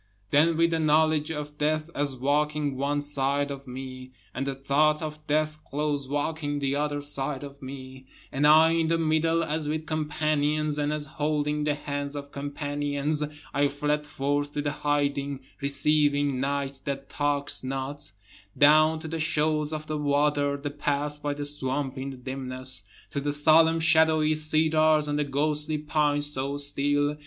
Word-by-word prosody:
Then 160 +3 +4
with 170 0 +3
the 165 - +1
knowledge 155 0 +3
of 150 -1 -6
death 155 +2 0
as 140 -2 -1
walking 145 +2 0
one 145 +2 0
side 145 0 0
of 140 -1 -8
me, 130 0 -8 0.2
And 135 +1 -3
the 135 - -2
thought 145 +3 +2
of 155 -1 -7
death 155 +1 0
close 145 -1 -2
walking 145 +1 -2
the 140 -1 -1
other 145 0 -1
side 140 -1 -2
of 140 0 -10
me, 130 0 -9 0.2
And 145 +2 +2
I 160 +2 +7
in 165 -1 +1
the 165 +1 +2
middle 165 +1 +2
as 155 -1 -2
with 155 +1 -2
companions, 150 -1 0
and 145 0 0
as 150 -1 -2
holding 150 0 -1
the 150 -1 +1
hands 145 -1 -4
of 140 0 -7
companions, 145 +1 -2 0.3
I 145 +1 +3
fled 150 +1 -1
forth 145 0 -1
to 145 - -2
the 145 - 0
hiding 140 -2 -1 0.2
receiving 145 -1 +2
night 140 0 -2
that 140 -1 -4
talks 145 -2 -1
not, 135 +1 -5 0.5
Down 155 +2 +6
to 160 - -6
the 165 +1 -4
shores 155 -1 0
of 155 -1 -4
the 155 -1 -3
water, 145 0 +1
the 145 0 -5
path 145 0 -2
by 145 0 -2
the 145 0 -4
swamp 140 -1 -2
in 135 +1 -4
the 135 - -8
dimness, 130 -3 -2 0.2
To 140 - -2
the 145 +1 -1
solemn 160 +2 +5
shadowy 160 -1 +4
cedars 155 0 +2
and 145 0 -1
the 150 - +1
ghostly 150 +2 +1
pines 150 -1 +1
so 140 -1 0
still. 145 +1 0
145 Hz, 165 wpm, -27 LUFS, 140-155 Hz, 0.5 s, I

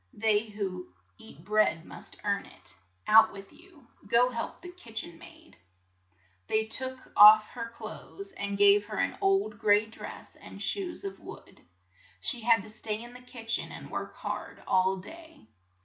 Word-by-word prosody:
"They 215 0 +1
who 190 - -5 0.3
eat 160 +5 -15
bread 205 -6 +2
must - - -7
earn 200 -1 -1
it. 90 - -13 0.3
Out 220 +1 +7
with 195 0 -12
you! 335 -7 -19 0.2
Go 240 +4 +4
help 230 -1 -5
the 355 - -9
lv,, 360 - -15
kitch 230 -9 -6
en 170 -1 -12
maid - - -16 0.4
!" 95 0 -39
They 220 0 +2
took 260 +3 +1
off 215 +1 +9
her 230 -2 -6
clothes, 390 +11 -10
and 200 - -4
gave 205 0 +5
her 215 - -6
an - - 0
old 390 - +1
gray 210 -1 +4
dress, 220 - -10
and - - -12
shoes 380 -2 -2
of 395 -1 -6
wood. - - -13 0.6
She 245 -4 -3
had 225 -2 +3
to 220 - -11
stay 215 0 -3
in 240 0 -11
the 250 - -12
kitch 235 -2 -4
en - - -7
and - - -10
work - - -5
hard - - -6
all 190 +1 +2
day. 320 - -13
220 Hz, 180 wpm, -29 LUFS, 200-250 Hz, 0.6 s, off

